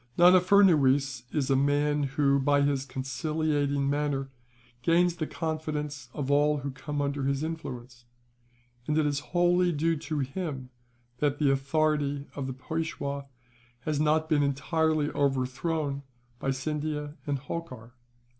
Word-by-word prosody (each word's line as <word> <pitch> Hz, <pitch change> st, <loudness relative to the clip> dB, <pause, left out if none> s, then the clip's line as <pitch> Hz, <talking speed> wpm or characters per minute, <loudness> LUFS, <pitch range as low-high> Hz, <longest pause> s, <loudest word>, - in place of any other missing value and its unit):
"Nana 180 Hz, +1 st, +7 dB
Furnuwees 140 Hz, -10 st, +4 dB
is 140 Hz, -3 st, 0 dB
a -, -, +5 dB
man 145 Hz, +2 st, +2 dB, 0.2 s
who, 140 Hz, -1 st, +4 dB
by 145 Hz, +1 st, +3 dB
his 140 Hz, -1 st, 0 dB
conciliating 145 Hz, +1 st, -1 dB
manner, 140 Hz, -1 st, -1 dB, 0.5 s
gains 170 Hz, +4 st, +3 dB
the 155 Hz, -3 st, -2 dB
confidence 150 Hz, -4 st, -4 dB
of 140 Hz, +1 st, -3 dB
all 150 Hz, +1 st, +3 dB
who 140 Hz, 0 st, -4 dB
come 145 Hz, +2 st, -3 dB
under 140 Hz, -1 st, -2 dB
his 140 Hz, +1 st, 0 dB
influence; 125 Hz, -7 st, -6 dB, 0.8 s
and 150 Hz, -, +1 dB
it 155 Hz, -, +3 dB
is 145 Hz, -1 st, 0 dB
wholly 175 Hz, +3 st, +2 dB
due 165 Hz, +1 st, +1 dB
to 155 Hz, 0 st, -4 dB
him 135 Hz, -2 st, -4 dB, 0.5 s
that 145 Hz, -1 st, +1 dB
the 145 Hz, -2 st, +3 dB
authority 145 Hz, 0 st, 0 dB
of 140 Hz, -2 st, -3 dB
the 130 Hz, -, -3 dB
Peishwa 140 Hz, -1 st, -4 dB, 0.5 s
has 150 Hz, +1 st, -1 dB
not 155 Hz, +1 st, +2 dB
been 155 Hz, -2 st, +3 dB
entirely 155 Hz, +2 st, +1 dB
overthrown 140 Hz, +2 st, -1 dB, 0.4 s
by 135 Hz, -, -2 dB
Scindia 150 Hz, +2 st, -3 dB
and 140 Hz, -1 st, 0 dB
Holkar. 130 Hz, -5 st, -7 dB
145 Hz, 135 wpm, -28 LUFS, 135-155 Hz, 0.8 s, Nana